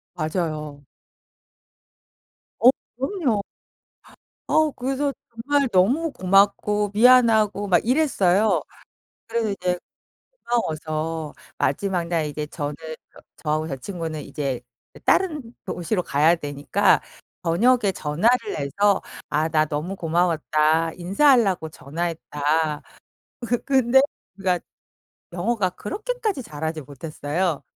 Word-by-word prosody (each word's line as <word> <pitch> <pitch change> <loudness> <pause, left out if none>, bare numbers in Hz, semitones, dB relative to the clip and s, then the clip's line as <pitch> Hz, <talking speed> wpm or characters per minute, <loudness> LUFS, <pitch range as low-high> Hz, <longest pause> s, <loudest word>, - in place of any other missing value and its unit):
맞아요. 155 -3 -3 1.7
어 235 - +8 0.3
그럼요. 270 - 0 1.1
어 310 -1 +3
그래서 270 +2 -2 0.2
정말 275 +4 0
너무 250 - +2
고맙고 200 +1 +2
미안하고 220 -3 +5
막 180 -1 +3
이랬어요. 220 - +3 0.7
그래서 225 -2 -1
이제 180 -2 -1 0.7
고마워서 160 -7 -2 0.2
마지막 180 +5 0
날 165 -3 0
이제 150 0 -4
저는 150 -1 -4 0.4
저 - - -15 0.2
저하고 155 +1 -1
제 135 - -3
친구는 160 0 -5
이제 140 -3 -3 0.3
그 - - -15
다른 300 -11 +1
도시로 180 +2 -2
가야 155 +3 +3
되니까 150 +6 +1 0.4
저녁에 200 +5 +3
전화를 210 +10 +1
해서 195 +8 +2 0.3
"아 155 +2 +1
나 155 -1 +3
너무 155 +6 -4
고마웠다. 165 -2 +1
인사하려고 195 - +3
전화했다." 155 0 -2 0.6
그 240 +1 +1
근데 265 -1 +4 0.4
그러니까 185 -3 0 0.7
영어가 185 +2 0
그렇게까지 430 - -3
잘하지 160 -4 -5
못했어요. 150 +4 -3
180 Hz, 240 characters per minute, -23 LUFS, 155-230 Hz, 1.7 s, 어